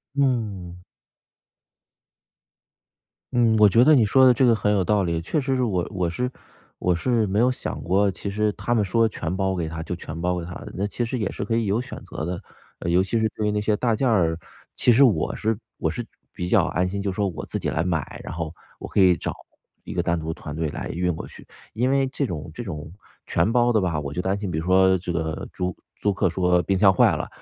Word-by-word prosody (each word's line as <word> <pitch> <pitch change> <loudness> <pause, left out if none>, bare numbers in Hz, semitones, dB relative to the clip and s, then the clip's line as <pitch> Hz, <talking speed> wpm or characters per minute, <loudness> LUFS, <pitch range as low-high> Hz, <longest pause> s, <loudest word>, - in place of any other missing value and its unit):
嗯。 105 -10 -1 2.5
嗯， 115 -2 +4
我 105 -1 +7
觉 115 +5 +5
得 155 +2 +6
你 115 -5 +5
说 130 +5 +5
的 125 - +8
这 130 +2 +3
个 120 - +5
很 105 -1 +1
有 100 -3 +2
道 105 +2 +2
理。 85 -2 -1
确 145 - -1
实 135 0 0
是 130 - +1
我 95 -7 0
我 90 -3 -1
是 125 +9 -2 0.5
我 90 -1 +1
是 115 +3 +1
没 100 +1 0
有 125 +2 +4
想 125 - -5
过， 95 +3 +2
其 100 +2 -6
实 105 +1 0
他 120 - -1
们 105 -3 +2
说 115 +2 +2
全 85 -2 -4
包 95 -1 0
给 85 -3 -2
他 80 0 -5
就 85 +2 -4
全 80 -1 -7
包 90 0 0
给 85 - -4
他 85 - -8
的， - - -8
那 100 +2 -1
其 110 +4 -2
实 120 +2 -2
也 105 -4 -2
是 - - -4
可 115 +3 -1
以 115 - +1
有 105 +4 +1
选 125 - -8
择 75 -2 -6
的。 90 +1 -3 0.4
呃， 85 - -3
尤 90 - +4
其 110 +4 -1
是 110 - +2
对 105 -1 -1
于 - - +1
那 105 - 0
些 105 0 +1
大 115 0 +1
件 130 +3 0
儿， 85 -8 +2 0.4
其 120 - +4
实 125 +5 +6
我 105 - +2
是 110 -1 -1 0.2
我 - - 0
是 - - -4 0.3
比 90 - -4
较 95 -2 +4
安 90 0 0
心， 100 +2 -3
就 100 -1 -1
是 - - -8
说 100 0 +1
我 80 -5 -5
自 - - -2
己 - - -2
来 80 - 0
买， 85 -6 -3
然 - - -6
后 80 -1 -4 0.2
我 - - -7
可 - - -1
以 90 -2 +5
找 - - -3 0.5
一 - - -7
个 - - +1
单 85 0 0
独 80 +1 -4
的 - - -3
团 75 0 -7
队 80 -1 -1
来 - - -5
运 90 +1 0
过 - - -6
去。 - - -14 0.3
因 125 +4 +1
为 135 0 +3
这 135 +1 -2
种 80 -4 -6
这 120 - -6
种 75 -5 -7 0.3
全 110 - +1
包 120 0 +3
的 110 - +3
吧， 85 -4 0
我 70 -1 -5
就 90 - -2
担 95 +2 0
心 100 -3 -4
比 80 - -1
如 80 - -5
说 95 +1 +5
这 90 0 -4
个 80 -2 -3
租 90 -1 -3 0.2
租 105 - 0
客 90 - +1
说 90 0 +2
冰 95 +1 0
箱 95 0 +6
坏 - - +4
啦， - - -4
95 Hz, 275 characters per minute, -24 LUFS, 85-115 Hz, 2.5 s, 的